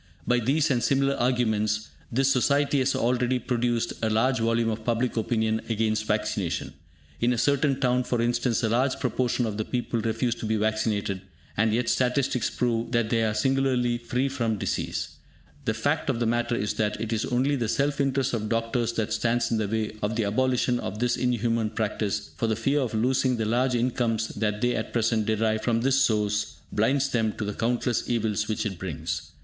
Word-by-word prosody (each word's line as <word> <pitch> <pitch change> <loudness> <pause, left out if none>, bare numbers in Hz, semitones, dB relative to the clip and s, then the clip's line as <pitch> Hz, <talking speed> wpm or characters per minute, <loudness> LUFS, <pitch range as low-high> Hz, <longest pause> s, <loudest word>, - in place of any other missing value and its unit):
By 125 0 +3
these 140 +6 +1
and 120 -2 +2
similar 135 +1 +2
arguments, 110 -4 0 0.2
this 135 +3 +3
society 140 +2 +2
has 130 +1 +1
already 125 +1 +1
produced 120 -2 -1
a 110 - +1
large 125 +4 +2
volume 115 0 +1
of 110 0 -5
public 120 +2 0
opinion 110 -1 0
against 110 -1 0
vaccination. 105 -4 -1 0.5
In 120 - +2
a 120 - 0
certain 140 +2 +2
town, 125 -1 +2
for 120 -1 -1
instance, 120 +1 +1
a 115 - +2
large 130 +4 +1
proportion 125 -1 0
of 105 -2 -3
the 110 - 0
people 120 -1 -2
refuse 115 +2 0
to 110 - -4
be 110 - +1
vaccinated, 105 -2 0 0.3
and 110 +1 +2
yet 115 +2 0
statistics 125 -1 +1
prove 120 -1 -1
that 115 -2 +1
they 115 -1 +2
are 110 -1 0
singularly 125 0 +1
free 125 +3 -1
from 115 -5 -1
disease. - - -3 0.5
The - - 0
fact - - 0
of 115 - 0
the 120 - +1
matter 120 +1 +1
is 105 -2 -1
that 105 -1 -1
it 115 +1 -2
is 110 - 0
only 130 +3 +1
the 120 -5 -1
self 140 +3 +1
interest 135 -2 0
of 110 -2 -2
doctors 115 +1 0
that 110 -1 -1
stands 115 +1 0
in 115 - +1
the 105 - 0
way 110 +1 -1
of 105 +2 -1
the 115 - +1
abolition 125 +3 +1
of 105 - -5
this 120 +1 +1
inhuman 115 -3 0
practice, 105 -1 -2
for 115 - 0
the 110 - +1
fear 135 +6 +1
of 125 -5 -2
losing 125 +2 +2
the 110 - -1
large 125 +3 +1
incomes 115 -2 0
that 105 0 -2
they 125 0 +2
at 110 - -4
present 115 -2 +1
derive 110 0 +1
from 115 -1 +1
this 135 +2 +3
source 105 -4 +1 0.2
blinds 135 +6 +2
them 115 -4 0
to 110 - -4
the 105 - -3
countless 120 +2 -1
evils 110 -3 0
which 110 - -2
it 95 -4 -4
brings. 80 -4 -4
115 Hz, 200 wpm, -26 LUFS, 110-125 Hz, 0.5 s, By